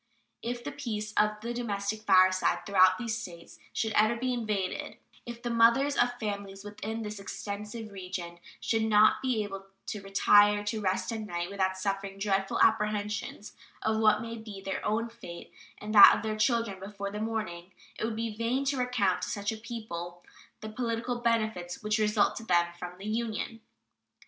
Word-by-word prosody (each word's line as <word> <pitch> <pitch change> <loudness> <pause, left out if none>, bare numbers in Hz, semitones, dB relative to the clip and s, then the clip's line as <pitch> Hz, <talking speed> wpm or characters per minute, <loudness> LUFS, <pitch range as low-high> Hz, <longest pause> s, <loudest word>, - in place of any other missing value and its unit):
If 240 +1 -4
the - - -4
peace 215 -6 -4
of 210 0 +2
the 235 +1 -3
domestic 215 -3 -3
fireside 185 -2 +4
throughout 185 -2 +5
these 235 -2 -2
States 170 -4 -11
should 220 - -1
ever 215 +2 +4
be 255 +2 -1
invaded, 210 -6 -2 0.3
if 235 0 -8
the 240 - -2
mothers 235 +5 +4
of 245 0 +2
families 200 -2 -5
within 215 +2 -5
this 210 -1 -6
extensive 210 +2 -6
region 180 -3 -6 0.2
should 225 -1 0
not 215 -1 +5
be 250 -5 0
able 195 -1 -7 0.2
to 210 - -5
retire 205 +1 +5
to 215 +1 -2
rest 190 +3 0
at 225 - -3
night 175 -3 -4
without 190 -1 0
suffering 195 0 -3
dreadful 195 -1 0
apprehensions 210 -1 0 0.3
of 220 0 +1
what 215 0 +4
may 230 0 -6
be 215 -3 -9
their 195 0 -4
own 230 +2 0
fate 230 -7 -11 0.2
and 215 +1 -6
that 205 - +10
of - - -6
their 215 -1 -1
children 230 -3 +1
before 200 0 -6
the 210 - -5
morning, 195 -6 -4 0.3
it - - -3
would 225 0 -1
be 225 -1 -3
vain 240 +5 0
to 275 0 0
recount 230 -8 +1
to - - -3
such 205 0 -2
a - - -4
people 175 -7 -7 0.4
the 215 - -6
political 235 +1 -2
benefits 220 -6 -1
which 215 +1 +1
result 210 -1 +2
to - - -6
them 175 -4 +3
from 180 +1 -8
the 195 - -10
Union. 225 0 -3
210 Hz, 180 wpm, -29 LUFS, 195-230 Hz, 0.4 s, that